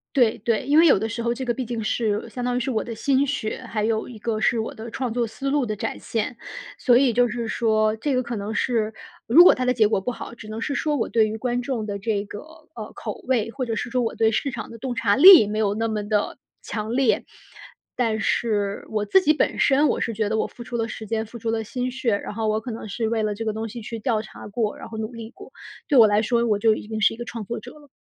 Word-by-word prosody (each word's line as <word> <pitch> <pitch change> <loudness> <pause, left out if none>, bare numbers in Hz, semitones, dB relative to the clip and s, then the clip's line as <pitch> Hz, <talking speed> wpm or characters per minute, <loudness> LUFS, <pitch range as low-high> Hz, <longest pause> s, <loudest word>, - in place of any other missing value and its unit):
对 240 -4 +3
对。 220 0 0
因 290 +3 +3
为 335 - +7
有 275 - +6
的 220 +3 -2
时 235 +1 -4
候 235 0 0
这 260 +1 -5
个 240 - 0
毕 255 -1 -4
竟 230 -2 -4
是 215 0 -1
相 245 +2 -6
当 245 0 0
于 - - +1
是 255 +2 -2
我 220 - -1
的 230 -2 -6
心 275 +3 +2
血， 255 -3 -3
还 215 -2 -2
有 220 0 0
一 240 -3 -10
个 220 0 -2
是 235 - +2
我 220 - -3
的 225 +1 -8
创 250 -3 -3
作 240 -1 0
思 270 +5 -4
路 285 -3 +1
的 215 -1 -3
展 - - -4
现。 230 +1 -3 0.4
所 245 -2 +4
以 255 -3 +3
就 245 +1 +4
是 235 0 -4
说 215 -1 +1
这 275 +3 -1
个 255 - +1
可 235 0 -5
能 205 +2 -4
是 225 -4 0 0.3
如 315 +10 +8
果 - - +8
它 255 - -2
的 250 - +3
结 220 -3 +4
果 200 -3 0
不 250 - -2
好， 235 - -8
只 215 -3 -11
能 215 +1 -6
是 280 - -2
说 300 -2 0
我 230 - -1
对 220 -2 +3
于 220 +1 -4
观 245 +1 -1
众 240 -4 -3
的 200 -1 -4
这 205 -1 -1
个， 205 - -8 0.4
呃， 215 -2 -7
口 215 - -6
味， 230 -3 +1
或 255 0 -3
者 225 -1 -2
是 240 - -3
说 250 +1 0
我 225 - -2
对 225 0 +3
市 270 +5 -1
场 225 -2 -6
的 230 - -9
洞 245 +1 -4
察 215 -3 +2
力 340 - +9
没 215 +1 -2
有 205 -2 +1
那 225 +1 -1
么 215 -1 -2
地 210 -1 0 0.2
强 215 +1 -4
烈。 265 -3 +2 0.7
但 220 -3 +1
是 205 -3 -1
我 210 -1 -1
自 380 - +4
己 305 - +4
本 - - 0
身 285 +2 +4
我 - - 0
是 230 - -2
觉 210 -1 -1
得 220 - 0
我 - - +1
付 240 - -10
出 245 -1 -5
了 225 0 -1
时 220 -1 -8
间、 220 0 -1
付 235 +2 -10
出 225 - -3
了 225 0 -1
心 250 +3 -3
血， 245 -4 0
然 200 - -5
后 220 +1 -2
我 215 +1 0
可 245 - -7
能 220 -1 -6
是 220 +2 -2
为 225 -2 0
了 210 -1 0
这 225 +2 -5
个 220 - -1
东 220 +1 -4
西 230 +2 -8
去 230 +2 -6
调 220 -1 0
查 - - -11
过， 210 0 -2
然 - - -9
后 220 -1 -7
努 220 +2 -4
力 230 -1 -8
过， - - -14 0.4
对 285 - +3
我 230 - +9
来 210 0 +3
说 235 +1 +1
我 210 -3 +1
就 220 -1 +4
已 210 - -8
经 220 -1 -4
是 220 - +3
一 - - -19
个 240 - -6
创 230 -2 -6
作 235 +4 -5
者 - - -11
了。 295 -1 -17
225 Hz, 310 characters per minute, -23 LUFS, 215-245 Hz, 0.7 s, 力